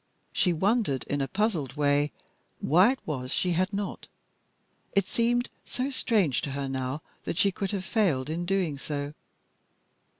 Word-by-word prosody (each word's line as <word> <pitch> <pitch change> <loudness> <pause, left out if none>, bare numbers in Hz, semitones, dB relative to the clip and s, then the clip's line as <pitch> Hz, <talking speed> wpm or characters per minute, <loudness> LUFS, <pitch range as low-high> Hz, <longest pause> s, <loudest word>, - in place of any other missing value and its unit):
She 180 - +3
wondered 190 - +1
in 145 0 -1
a 135 - 0
puzzled 190 - 0
way 145 0 +3 0.5
why 185 - +5
it 270 - -10
was 135 -5 -3
that - - -1
she 180 - +1
had 185 +3 +1
not. 200 -1 -4 0.9
It 200 -1 +3
seemed 240 +4 +1 0.2
so 260 +2 -2
strange 210 - +2
to 140 - -3
her 140 0 -2
now 130 +2 -3 0.2
that - - -2
she 200 +1 +4
could 195 +1 -3
have 190 -2 -3
failed 175 - +2
in 165 +3 -2
doing 180 -7 0
so. 145 0 -3
175 Hz, 165 wpm, -28 LUFS, 145-205 Hz, 0.9 s, why